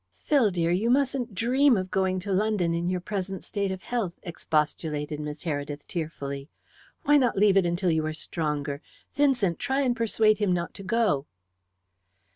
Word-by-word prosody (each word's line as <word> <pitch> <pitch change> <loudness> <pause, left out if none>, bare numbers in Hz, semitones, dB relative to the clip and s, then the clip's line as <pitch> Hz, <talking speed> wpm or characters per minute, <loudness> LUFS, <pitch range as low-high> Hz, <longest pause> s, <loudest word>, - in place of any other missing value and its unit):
"Phil, 275 -8 +4
dear, 170 -2 0
you 200 +7 +1
mustn't 260 -4 +1
dream 250 +4 +4
of 185 -1 -3
going 190 -1 +1
to 200 +2 -4
London 195 -4 +1
in 170 +1 -1
your 180 0 0
present 195 0 -4
state 200 -2 -2
of 190 -1 -6
health," 230 -8 -2
expostulated 150 -3 -2
Miss 150 0 -6
Heredith 145 -2 -4
tearfully. 140 -4 -5 0.5
"Why 295 -1 +5
not 250 -7 +2
leave 200 -1 +5
it 190 -3 +4
until 175 +1 +1
you 160 -1 +1
are - - -1
stronger? 150 -3 -3 0.3
Vincent, 255 - +2
try 275 0 0
and 250 -3 +1
persuade 220 -2 +2
him 200 -4 +2
not 175 -1 -2
to 195 - -9
go." 190 -9 +1
185 Hz, 170 wpm, -27 LUFS, 160-225 Hz, 0.5 s, Why